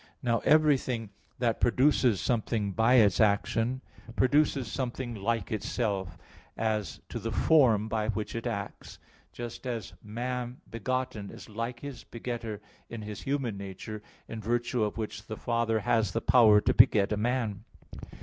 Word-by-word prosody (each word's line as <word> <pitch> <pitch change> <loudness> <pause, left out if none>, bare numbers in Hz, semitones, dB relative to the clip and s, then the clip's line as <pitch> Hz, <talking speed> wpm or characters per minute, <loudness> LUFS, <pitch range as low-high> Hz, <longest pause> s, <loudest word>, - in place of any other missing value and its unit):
Now, 115 -2 +2
everything 130 -8 +2 0.3
that 120 -2 0
produces 125 -3 +3
something 110 -3 0
by 115 +6 +3
its 105 -6 +5
action, 115 +4 +1 0.3
produces 140 0 +3
something 125 0 -3
like 110 0 -2
itself, 100 -5 -2 0.4
as 110 -7 -2
to - - -4
the - - -4
form 120 -9 +4
by 110 -1 -1
which 110 -1 -2
it 115 +1 -3
acts; 100 -4 -5 0.3
just 120 +2 -7
as 115 -5 -4
man 125 +3 -4
begotten 120 -2 -3
is - - -11
like 115 +3 -4
his 140 -3 -7
begetter 115 -3 -5 0.3
in 115 -2 -6
his 105 -1 -7
human 135 -7 -2
nature, 100 +2 -7 0.3
in 115 - -6
virtue 120 +1 0
of 105 - -2
which 110 0 -5
the 110 - -5
father 115 -2 0
has 110 -3 +1
the - - +1
power 110 -4 +6
to - - +2
beget 100 -1 +5
a - - +2
man. 115 -3 -1
115 Hz, 150 wpm, -29 LUFS, 105-125 Hz, 0.4 s, power